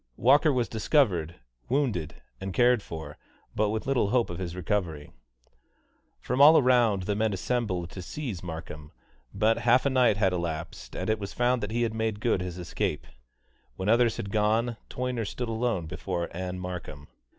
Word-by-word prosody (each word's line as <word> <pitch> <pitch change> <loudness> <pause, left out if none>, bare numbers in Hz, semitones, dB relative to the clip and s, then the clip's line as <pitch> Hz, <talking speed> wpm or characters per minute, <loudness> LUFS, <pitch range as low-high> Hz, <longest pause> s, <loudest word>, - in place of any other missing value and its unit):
Walker 145 +6 +5
was 125 -4 0
discovered 105 - +1 0.3
wounded, 120 - -1 0.2
and 95 -1 -5
cared 125 -2 +4
for, 80 -5 -8 0.3
but 105 0 +1
with 110 +1 -2
little 130 -7 +1
hope 120 -4 +1
of 85 - -6
his 90 -2 -4
recovery. 85 -5 -2 1.1
From 130 +2 -1
all 155 +3 +9
around 120 -7 +3
the 105 - -1
men 110 0 +1
assembled 95 -5 -2
to 95 - -7
seize 110 - -5
Markham, 80 -3 -8 0.4
but 110 +3 +2
half 120 +3 +3
a 140 - +2
night 125 -5 +4
had 95 -3 +2
elapsed, 85 -2 -5
and - - -3
it 110 -1 +1
was 100 -1 -6
found 125 0 +1
that 105 - -3
he 120 +2 0
had 115 -1 -1
made 110 -2 -2
good 110 -4 +1
his 90 -1 -5
escape. 90 -1 -3 0.7
When 95 - -5
the 105 - +5
others 120 -1 +3
had 100 - -5
gone, 110 +3 +1
Toyner 125 -2 -2
stood 120 +3 -4
alone 115 -6 -1
before 85 0 -4
Ann 90 0 -4
Markham. 90 -6 -7
105 Hz, 175 wpm, -27 LUFS, 90-120 Hz, 1.1 s, all